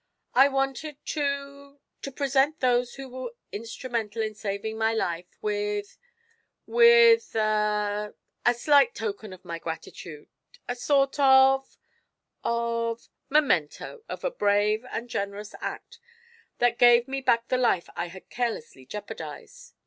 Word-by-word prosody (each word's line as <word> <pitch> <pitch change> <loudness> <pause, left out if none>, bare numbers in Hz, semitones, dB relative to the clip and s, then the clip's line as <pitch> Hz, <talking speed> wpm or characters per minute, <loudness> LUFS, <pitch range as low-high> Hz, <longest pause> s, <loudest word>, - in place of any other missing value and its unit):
I 265 +3 +7
wanted 270 +2 -2
to 280 -1 -3 0.2
to 275 - -6
present 275 +2 +1
those 245 -1 +1
who 270 0 -8
were 255 -2 -7 0.2
instrumental 230 0 -4
in 215 0 -3
saving 210 +1 -4
my 225 0 +1
life 175 -4 -2 0.2
with 205 -1 -2 0.7
with 470 - +6
a 210 -1 0 0.3
a 240 - +4
slight 275 0 +4
token 215 -1 -5
of 185 0 -13
my 170 -1 -5
gratitude 160 -1 -8 0.4
a 245 - -2
sort 275 +2 +1
of 270 0 +5 0.7
of 235 0 -2 0.2
memento 290 - 0
of - - -6
a - - 0
brave 210 - +1
and 235 - -4
generous 205 -1 -4
act - - -6 0.6
that 240 -1 +1
gave 240 0 +6
me 270 0 -3
back 235 -2 +1
the 255 - +2
life 235 -8 +1
I 170 - -3
had 185 +2 -12
carelessly 225 - -4
jeopardized. 480 - -9
235 Hz, 130 wpm, -26 LUFS, 210-270 Hz, 0.7 s, I